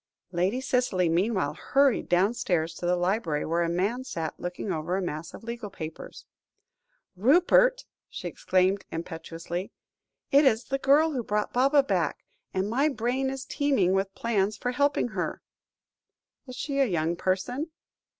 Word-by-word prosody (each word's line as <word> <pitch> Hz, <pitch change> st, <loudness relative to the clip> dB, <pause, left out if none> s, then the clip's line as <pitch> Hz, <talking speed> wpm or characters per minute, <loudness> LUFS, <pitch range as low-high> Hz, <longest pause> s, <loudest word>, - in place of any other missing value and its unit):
Lady 185 Hz, +7 st, 0 dB
Cicely 250 Hz, -9 st, +1 dB
meanwhile 180 Hz, -3 st, +1 dB
hurried 275 Hz, -, +2 dB
downstairs 175 Hz, -3 st, +1 dB
to 175 Hz, -, -4 dB
the 180 Hz, -, +3 dB
library, 175 Hz, -4 st, 0 dB
where 170 Hz, +2 st, 0 dB
a 170 Hz, -, +1 dB
man 200 Hz, +9 st, 0 dB
sat 165 Hz, -11 st, -4 dB
looking 180 Hz, +3 st, -4 dB
over 170 Hz, +2 st, -1 dB
a -, -, -1 dB
mass 155 Hz, -1 st, -5 dB
of -, -, -12 dB
legal 235 Hz, -2 st, -5 dB
papers. 160 Hz, -4 st, -8 dB, 0.9 s
"Rupert," 360 Hz, -, +4 dB, 0.2 s
she -, -, -6 dB
exclaimed 190 Hz, +2 st, +1 dB
impetuously, 165 Hz, +2 st, -5 dB, 0.6 s
"it 280 Hz, +2 st, +6 dB
is 240 Hz, -4 st, +3 dB
the 270 Hz, 0 st, -2 dB
girl 295 Hz, +4 st, +4 dB
who 260 Hz, -4 st, -1 dB
brought 210 Hz, -1 st, -1 dB
Baba 275 Hz, +3 st, +4 dB
back, -, -, -1 dB, 0.3 s
and 190 Hz, +1 st, -1 dB
my 270 Hz, +8 st, +2 dB
brain 255 Hz, +1 st, -1 dB
is 265 Hz, 0 st, -5 dB
teeming 270 Hz, -11 st, +1 dB
with 195 Hz, 0 st, -1 dB
plans 210 Hz, -3 st, 0 dB
for 245 Hz, -, -2 dB
helping 285 Hz, -1 st, +1 dB
her." -, -, -4 dB, 1.0 s
"Is 255 Hz, -, -8 dB
she 280 Hz, +1 st, -2 dB
a 275 Hz, -, +5 dB
young 170 Hz, -5 st, 0 dB
person?" 220 Hz, -, -1 dB
205 Hz, 150 wpm, -27 LUFS, 175-265 Hz, 1.0 s, it